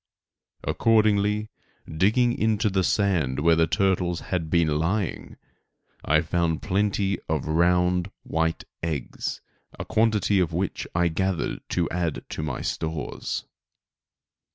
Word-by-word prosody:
Accordingly, 105 -1 +2 0.4
digging 110 +9 +2
into 110 -1 +1
the 95 -1 +1
sand 90 -11 +1
where 85 +1 +5
the 80 0 +3
turtles 90 -4 +1
had 85 -4 -3
been 80 -3 +2
lying, 95 +3 -2 0.7
I 80 0 +3
found 85 -1 -1
plenty 100 -1 0
of 80 -3 0
round 90 +2 +2
white 80 0 -1 0.2
eggs, 80 -6 -3 0.4
a - - -5
quantity 110 -3 +2
of 85 -2 0
which 90 +3 -2
I 85 0 +3
gathered 95 +2 -1
to 85 -2 0
add 85 -3 -2
to - - -4
my 75 -4 -3
stores. 80 -2 -3
90 Hz, 120 wpm, -25 LUFS, 80-100 Hz, 0.7 s, where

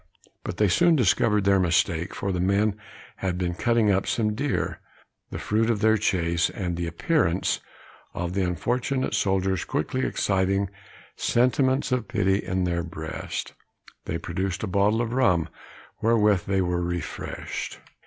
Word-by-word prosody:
But 90 - -5
they 105 - +4
soon 170 - +4
discovered 105 -3 +3
their 100 0 +4
mistake, 85 0 +1
for 100 - -2
the 90 - -2
men 100 +3 +2 0.4
had 90 -2 -2
been 90 -1 -1
cutting 115 +2 +2
up 95 0 +1
some 105 -2 +1
deer, 140 +6 -2 0.5
the - - -5
fruit 110 +2 0
of 115 -3 +1
their 110 0 +5
chase; 85 -5 +1
and 90 -3 -3
the 85 0 -3
appearance 90 - +1 0.6
of 90 0 -3
the 100 - 0
unfortunate 120 - -1
soldiers 95 -2 +1
quickly 130 +11 -2
exciting 95 0 0 0.4
sentiments 130 +3 +2
of 125 -5 0
pity 95 -1 +2
in 95 -2 -1
their 85 -1 0
breast, 80 -2 -5 0.5
they 85 - -2
produced 95 +4 -3
a - - -1
bottle 100 +4 +2
of 115 0 -4
rum, 90 -11 +3 0.5
wherewith 105 -4 +3
they 95 -1 +2
were 90 0 -1
refreshed. 85 0 -4
95 Hz, 150 wpm, -25 LUFS, 90-110 Hz, 0.6 s, their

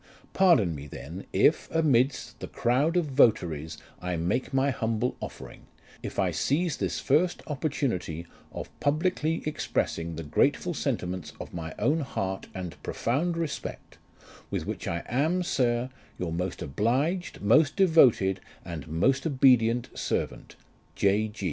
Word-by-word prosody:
Pardon 165 - +4
me 70 -1 -7
then, 80 +6 -8
if, 125 - +3
amidst 140 -5 +1
the - - -6
crowd 140 +9 +1
of 175 - +2
votaries, 90 - +2 0.2
I 90 0 -2
make 85 +10 -1
my 135 +1 +2
humble 115 +1 -1
offering, - - -9 0.3
if - - -6
I - - +2
seize 165 +4 0
this - - -2
first 165 +6 +1
oppor 150 +1 -2
tunity 90 - -2 0.3
of - - -7
publicly 160 +2 0
expressing 85 - -2
the 80 - -5
grateful 75 - +1
sentiments 90 -1 -3
of - - -8
my 80 -2 -5
own 145 +9 +2
heart 95 -9 -3
and 90 -3 -6
profound 165 +9 -1
respect, 165 -4 -5 0.5
with - - -2
which - - -5
I 85 0 -2
am, 160 +9 +1
Sir, 125 -5 0 0.3
your 90 -2 -3
most 90 +1 -3
obliged, 135 - 0
most 140 +9 +4
devoted, 130 - +5 0.3
and 80 -4 -6
most 130 - +1
obedient 125 -4 +4
servant, - - -3 0.2
" - - -35
J. 105 +2 +2
120 Hz, 140 wpm, -28 LUFS, 90-150 Hz, 0.5 s, devoted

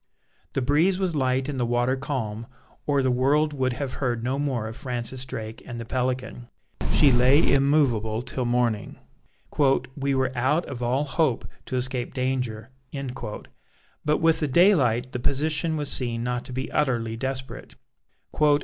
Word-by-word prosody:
The 135 - 0
breeze 160 +8 +3
was 185 -4 -1
light 130 -1 +1
and 140 -3 -3
the - - +1
water 120 +2 +1
calm, 115 -5 -4 0.4
or 140 -2 +2
the 130 - +2
world 145 +5 +2
would 130 -3 0
have 135 0 -4
heard 120 -3 0
no 130 +3 -1
more 130 -6 -1
of 110 - -7
Francis 125 -1 -4
Drake 110 -4 -6
and 120 -1 -7
the 115 - -5
Pelican. 125 0 -3 0.4
She 140 - +5
lay 130 +5 +5
immovable 130 -6 +3
till 130 0 -2
morning; 120 -3 0 1.0
"we 140 -1 0
were 130 0 0
out 135 +8 +1
of 125 -3 -7
all 125 +4 +1
hope 150 -3 0 0.2
to - - -3
escape 125 -1 -2
danger," 125 -3 -2 1.3
but 150 +1 +2
with 165 -1 +3
the 150 - 0
daylight 130 - +4
the 125 - -3
position 155 +5 0
was 145 -2 -2
seen 120 -3 -1
not 125 0 -2
to 130 - -9
be 130 +1 -4
utterly 120 -6 0
desperate. 130 +2 -5
130 Hz, 160 wpm, -25 LUFS, 120-140 Hz, 1.3 s, She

